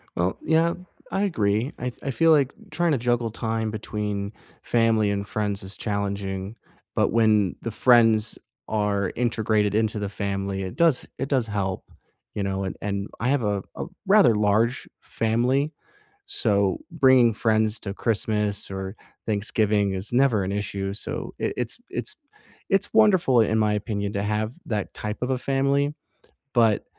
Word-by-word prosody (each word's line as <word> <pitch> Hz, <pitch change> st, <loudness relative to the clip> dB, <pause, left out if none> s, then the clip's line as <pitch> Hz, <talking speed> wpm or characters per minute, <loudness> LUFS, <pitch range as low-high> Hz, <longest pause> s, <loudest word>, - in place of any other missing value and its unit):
Well, 90 Hz, +2 st, 0 dB
yeah, 165 Hz, +2 st, +3 dB, 0.4 s
I 195 Hz, +1 st, 0 dB
agree. 115 Hz, -, 0 dB
I 125 Hz, 0 st, -2 dB
I 135 Hz, -, -1 dB
feel 165 Hz, +5 st, +4 dB
like 145 Hz, -4 st, +4 dB, 0.2 s
trying 175 Hz, -1 st, +1 dB
to 145 Hz, -, +2 dB
juggle 120 Hz, -1 st, 0 dB
time 110 Hz, -1 st, -2 dB
between 105 Hz, -1 st, -4 dB, 0.3 s
family 115 Hz, -3 st, +2 dB
and 100 Hz, 0 st, -2 dB
friends 105 Hz, -2 st, -2 dB
is 95 Hz, +1 st, -6 dB
challenging, 100 Hz, -1 st, -3 dB, 0.4 s
but -, -, +3 dB
when 110 Hz, -4 st, +3 dB
the 115 Hz, -, -4 dB
friends 115 Hz, -1 st, +4 dB, 0.3 s
are 105 Hz, -3 st, 0 dB
integrated 110 Hz, -4 st, +1 dB
into 110 Hz, 0 st, +1 dB
the 100 Hz, -1 st, -3 dB
family, 100 Hz, -1 st, -3 dB
it 95 Hz, -, -6 dB
does 165 Hz, -5 st, +3 dB
it 135 Hz, +2 st, -3 dB
does 130 Hz, -5 st, +1 dB
help. 100 Hz, -3 st, -2 dB, 0.5 s
You 105 Hz, -, -1 dB
know? 95 Hz, 0 st, -2 dB
And 95 Hz, -, -4 dB
and 100 Hz, 0 st, -2 dB
I 115 Hz, -, 0 dB
have 140 Hz, -3 st, +2 dB
a 100 Hz, -2 st, -1 dB
a -, -, -4 dB, 0.2 s
rather 195 Hz, -, +6 dB
large 110 Hz, +4 st, +1 dB
family, 125 Hz, +6 st, 0 dB, 0.6 s
so 100 Hz, -, +1 dB
bringing 130 Hz, -8 st, +5 dB
friends 110 Hz, -1 st, +1 dB
to 100 Hz, -1 st, -5 dB
Christmas 105 Hz, -2 st, -1 dB
or 95 Hz, +1 st, -5 dB, 0.3 s
Thanksgiving 105 Hz, -1 st, +1 dB
is 95 Hz, +4 st, -4 dB
never 125 Hz, -5 st, +3 dB
an 95 Hz, -, -3 dB
issue. 100 Hz, -1 st, -3 dB
So, 105 Hz, -, -5 dB
it -, -, -1 dB
it's 125 Hz, -, -2 dB
it's 420 Hz, +3 st, -3 dB, 0.5 s
it's 195 Hz, 0 st, +1 dB
wonderful 185 Hz, -, +5 dB
in 110 Hz, 0 st, +2 dB
my 105 Hz, -1 st, +2 dB
opinion 105 Hz, -1 st, -2 dB
to 100 Hz, -, -1 dB
have 105 Hz, +2 st, -1 dB
that 105 Hz, -4 st, -3 dB
type 105 Hz, 0 st, -4 dB
of 125 Hz, -, -1 dB
a 130 Hz, -, +1 dB
family. 140 Hz, +2 st, +1 dB, 0.6 s
But 115 Hz, -4 st, +3 dB
110 Hz, 160 wpm, -25 LUFS, 100-125 Hz, 0.6 s, rather